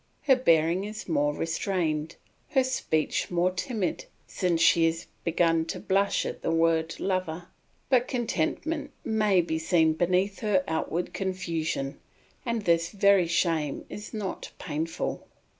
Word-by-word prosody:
Her 270 -3 +5
bearing 170 -5 +3
is 215 +1 -7
more 145 -3 +2
restrained, 165 -2 -1 0.3
her 265 -3 +3
speech 160 -11 -1
more 175 +1 +2
timid, 190 +1 -2 0.2
since 175 -3 0
she 165 0 +5
has 165 0 -2 0.2
begun 165 -1 +2
to - - -5
blush 200 +1 +1
at - - -5
the - - -1
word 165 0 +1
"lover"; 180 -3 -2 0.4
but 255 -2 +3
contentment 275 - -1 0.2
may 215 -4 +3
be 160 -1 -2
seen 160 -1 +3
beneath 185 +4 +1
her 205 -4 +2
outward 160 +2 -2
confusion 165 -7 -2 0.5
and 235 -2 -1
this 170 -2 +2
very 200 -2 +4
shame 165 -4 0
is 210 +1 -7
not 210 -4 -5
painful. 160 +1 -3
175 Hz, 135 wpm, -27 LUFS, 165-200 Hz, 0.5 s, Her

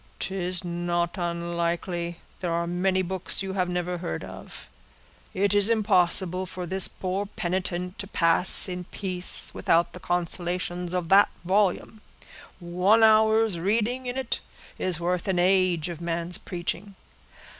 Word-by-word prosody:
"'Tis 185 -1 -2
not 175 0 -2
unlikely; 170 0 -2 0.2
there 175 -2 -2
are 170 0 0
many 185 +2 0
books 185 +1 -2
you 190 0 -4
have 185 -2 0
never 180 0 -2
heard 80 - -4
of: - - -10 0.6
it 200 +1 +1
is 205 +1 +4
impossible 185 -4 +2
for 180 0 -6
this 190 +2 +3
poor 190 +2 -3
penitent 180 -1 -3
to 200 - -3
pass 175 0 +4
in 180 -1 -5
peace, 185 -1 -2
without 170 +1 +1
the 180 - -9
consolations 175 0 -2
of 175 -2 -2
that 200 +1 +6 0.2
volume. 200 +3 +1 0.6
One 180 +6 +3
hour's 220 -3 +4
reading 230 +7 0
in 245 +1 -3
it 260 -3 -1 0.4
is 180 -3 -1
worth 175 +1 -1
an 190 -2 0
age 180 -2 +2
of 170 -2 -7
man's 170 +1 -2
preaching." 180 +3 -5
180 Hz, 140 wpm, -26 LUFS, 175-195 Hz, 0.6 s, that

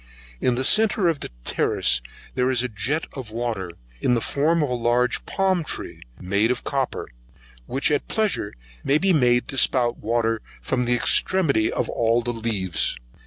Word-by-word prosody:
In 125 - +1
the 130 - -1
centre 215 0 +4
of 165 -4 +1
the - - -6 0.2
terrace - - +2 0.3
there 125 0 +1
is 125 -2 +3
a - - 0
Jet 125 +8 -2
d'eau, 120 -2 -3 0.5
in 125 -1 +2
form 155 +7 +1
of 145 - -1
a - - +1
large 120 +1 +1
palm 190 -3 +1
tree, - - -5 0.2
made 100 +5 +1
of 125 -1 -1
copper, 135 -2 -2 0.6
which 135 +3 +1
at 145 - 0
pleasure 210 - 0 0.3
may 140 - +3
be 190 +3 +2
made 125 -5 +3
to 135 - -1
spout 120 -2 +2
water 115 0 0 0.2
from 125 -1 -1
the 120 0 +2
extremity 140 -2 +2
of - - -1
all 115 +1 +1
the 120 +1 -2
leaves. 105 - -1
125 Hz, 165 wpm, -23 LUFS, 115-145 Hz, 0.6 s, centre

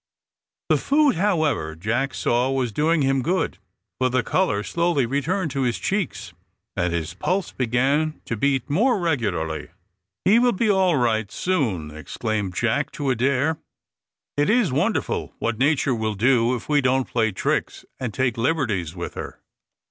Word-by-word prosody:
The - - +4
food, 290 -1 +3
however, 155 - +1
Jack 120 +10 -1
saw 120 +2 +1
was 130 -3 0
doing 155 +6 +2
him 135 0 +2
good, 170 - -1 0.4
for 130 0 +2
the 125 -1 +1
colour 105 -1 +1
slowly 170 -4 +1
returned 150 +7 -1
to 135 - -2
his 125 -2 0
cheeks, 190 - -3 0.4
and 90 -2 0
his 85 -1 -3
pulse 180 - -1
began 135 +6 0
to 115 - -2
beat 135 +3 0
more 220 - +2
regularly. 90 - -1 0.6
"He 215 +5 +6
will 245 0 +3
be 215 +2 +2
all 190 -5 +3
right 110 -4 +1
soon," 105 - -1
exclaimed 100 +3 -3
Jack 120 +5 0
to 140 -2 -1
Adair. 140 +5 +1 0.8
"It 145 +1 +1
is 225 - +3
wonderful 140 +3 -1
what 115 -1 -2
Nature 140 -1 +2
will 110 -2 -2
do 120 +2 +3
if 120 - -7
we 145 -1 +3
don't 130 0 +1
play 110 -2 +1
tricks, 95 - -2
and 125 -3 -3
take 125 0 0
liberties 115 - 0
with 85 - -5
her." - - -7
130 Hz, 155 wpm, -23 LUFS, 110-160 Hz, 0.8 s, He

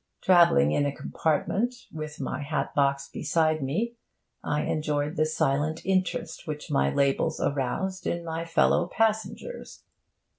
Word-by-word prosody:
Travelling 170 - +5
in 145 - +2
a - - -1
compartment, 195 - -1
with 155 -1 -6
my 140 +1 -3
hat 150 +2 -2
box 140 -1 +1
beside 155 -2 0
me, 215 - -2 0.5
I 150 0 0
enjoyed 150 -1 -1
the 155 +1 +2
silent 155 +1 0
interest 185 -2 -1
which 150 -1 -5
my 70 0 +2
labels 140 - +1
aroused 175 +8 -1
in 170 0 -2
my 165 0 -3
fellow 165 +1 +2
passengers. 220 - -2
155 Hz, 135 wpm, -27 LUFS, 145-175 Hz, 0.5 s, Travelling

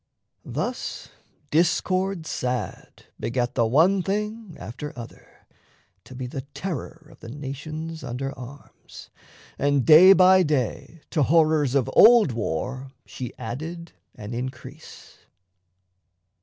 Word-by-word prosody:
Thus - - -5 0.4
Discord 180 +2 +1
sad 125 -4 -5
Begat 120 0 -2
the 115 -3 +1
one 170 - +3
Thing 210 0 -4
after 140 +6 -8
other, 120 -1 -12 0.6
to 130 - -12
be 125 0 -5
The 130 +2 -5
terror 165 0 -6
of - - -18
the - - -10
nations 150 +4 -7
under 135 +2 -5
arms, 130 +3 -13 0.5
And 140 -2 +1
day 170 +5 +9
by 185 0 +6
day 150 0 -2
to 155 - +1
horrors 155 -2 +3
of 135 -4 +2
old 230 - +7
war 125 - -4
She 125 -3 -8
added 160 +9 -7 0.2
an 105 +2 -8
increase. 130 +4 -9
145 Hz, 115 wpm, -24 LUFS, 125-170 Hz, 0.6 s, day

